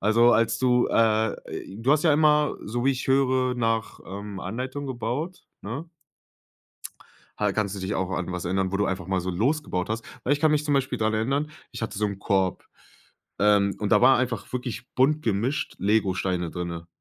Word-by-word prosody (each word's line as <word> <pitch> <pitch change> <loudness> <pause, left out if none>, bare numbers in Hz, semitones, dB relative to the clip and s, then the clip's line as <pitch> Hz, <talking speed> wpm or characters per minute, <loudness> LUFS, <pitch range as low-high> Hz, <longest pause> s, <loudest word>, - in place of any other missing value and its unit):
also 115 +3 +5
als 115 0 +2
du, 125 -1 +3
äh, 110 -1 +3 0.4
j 110 +4 -9
du 135 - +5
hast 150 - +2
ja 160 - +5
immer, 150 0 +3
so 120 +3 -3
wie 135 - +4
ich 130 - -5
höre, 130 -1 +2
nach, 115 -2 -1
ähm, 100 0 -7
Anleitung 130 +6 -4
gebaut, 130 +8 -4 0.2
ne? 125 +11 -5 1.5
Ha - - +1
kannst 105 -2 -1
du 100 - -6
dich 95 +2 -2
auch 95 -1 -1
an 95 - -2
was 90 -1 -4
erinnern, 95 +1 0
wo - - +1
du 105 - +1
einfach 95 -2 -3
mal 95 -1 0
so 90 - -3
losgebaut 105 - -1
hast? 110 +1 -3 0.2
Weil 135 - +2
ich 145 - +1
kann 155 - +4
mich 150 0 +2
zum 145 -1 +1
Beispiel 130 -2 0
daran 110 0 +1
erinnern, 135 +7 0 0.2
ich 120 - -8
hatte 110 -3 -3
so 105 - +1
'n 100 -2 -2
Korb, 95 -2 0 0.8
ähm, 100 -1 +4
und 105 -2 -2
da - - +6
war 130 +1 +7
einfach 120 -5 -2
wirklich 125 -2 -4
bunt 150 +4 +3
gemischt 115 +5 -1
Legosteine 95 -4 0
drinnen, 85 -1 -5
115 Hz, 200 wpm, -25 LUFS, 100-130 Hz, 1.5 s, war